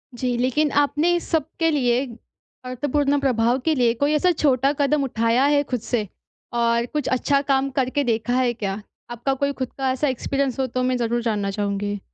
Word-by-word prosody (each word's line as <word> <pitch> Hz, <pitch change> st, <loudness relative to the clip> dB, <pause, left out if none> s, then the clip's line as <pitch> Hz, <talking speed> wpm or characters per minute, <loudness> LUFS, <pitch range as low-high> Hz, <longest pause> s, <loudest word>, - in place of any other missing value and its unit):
जी। 245 Hz, 0 st, -1 dB
लेकिन 260 Hz, +5 st, +1 dB
आपने 300 Hz, +4 st, +1 dB
इस 345 Hz, -, -3 dB
सबके 325 Hz, +1 st, 0 dB
लिए 255 Hz, -3 st, +1 dB, 0.6 s
अर्थपूर्ण 285 Hz, +3 st, 0 dB
प्रभाव 245 Hz, -2 st, +1 dB
के 320 Hz, -1 st, +2 dB
लिए 240 Hz, -3 st, +3 dB
कोई 290 Hz, +1 st, +2 dB
ऐसा 330 Hz, +4 st, +3 dB
छोटा 275 Hz, -4 st, +2 dB
कदम 285 Hz, 0 st, +2 dB
उठाया 235 Hz, 0 st, +1 dB
है 285 Hz, -, +4 dB
खुद 250 Hz, -, 0 dB
से? 225 Hz, -3 st, -2 dB, 0.5 s
और 235 Hz, 0 st, +1 dB
कुछ 295 Hz, +2 st, -3 dB
अच्छा 275 Hz, +2 st, +1 dB
काम 275 Hz, -1 st, +1 dB
करके 265 Hz, +2 st, 0 dB
देखा 235 Hz, -1 st, -1 dB
है 255 Hz, -2 st, +2 dB
क्या? 200 Hz, -2 st, -4 dB, 0.3 s
आपका 240 Hz, +3 st, -1 dB
कोई 280 Hz, +1 st, -1 dB
खुद 255 Hz, -, -2 dB
का 265 Hz, -1 st, 0 dB
ऐसा 265 Hz, +3 st, 0 dB
एक्सपीरियंस 270 Hz, 0 st, -1 dB
हो 265 Hz, -, +1 dB
तो 255 Hz, +1 st, -2 dB
मैं 255 Hz, 0 st, +1 dB
ज़रूर 240 Hz, 0 st, -1 dB
जानना 210 Hz, -4 st, -1 dB
चाहूँगी? 205 Hz, 0 st, -2 dB
255 Hz, 190 wpm, -22 LUFS, 235-280 Hz, 0.6 s, है